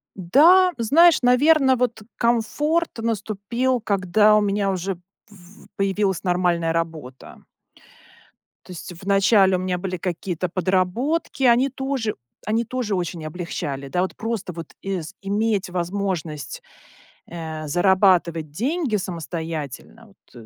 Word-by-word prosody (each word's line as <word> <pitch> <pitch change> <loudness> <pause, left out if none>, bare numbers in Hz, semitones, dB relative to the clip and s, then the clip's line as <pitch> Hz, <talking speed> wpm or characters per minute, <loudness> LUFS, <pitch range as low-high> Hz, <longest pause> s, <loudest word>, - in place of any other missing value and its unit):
Да, 325 - +5
знаешь, 315 +9 +5
наверно 265 +2 +4
вот, 240 -2 -1 0.2
комфорт 295 +8 +1
наступил, 225 +3 -1
когда 210 +1 +3
у 215 - +4
меня 200 -1 0
уже 190 +1 -3 0.3
пв 200 -2 -18
появилась 195 -2 0
нормальная 175 -3 +1
работа. 160 -6 -5 1.2
То - - -12
есть 180 +1 -8
вначале 195 0 +4
у - - -1
меня 185 0 -2
были 185 0 -4
какие-то 180 0 -3
подработки, 190 - -1
они 250 +2 +4
тоже 265 -4 -3 0.3
они 225 +2 +1
тоже 240 -4 -2
очень 175 -2 -4
облегчали, 155 -4 -5
да 180 +6 -1
вот, 185 - -2
просто 225 -4 -4
вот 165 -2 -9 0.5
иметь 205 0 0
возможность, 175 -6 -4 0.6
э, 160 -2 -6
зарабатывать 175 -2 +2
деньги 260 - -1
самостоятельно- 165 - -5 0.3
вот 120 -2 -12
195 Hz, 115 wpm, -22 LUFS, 175-230 Hz, 1.2 s, Да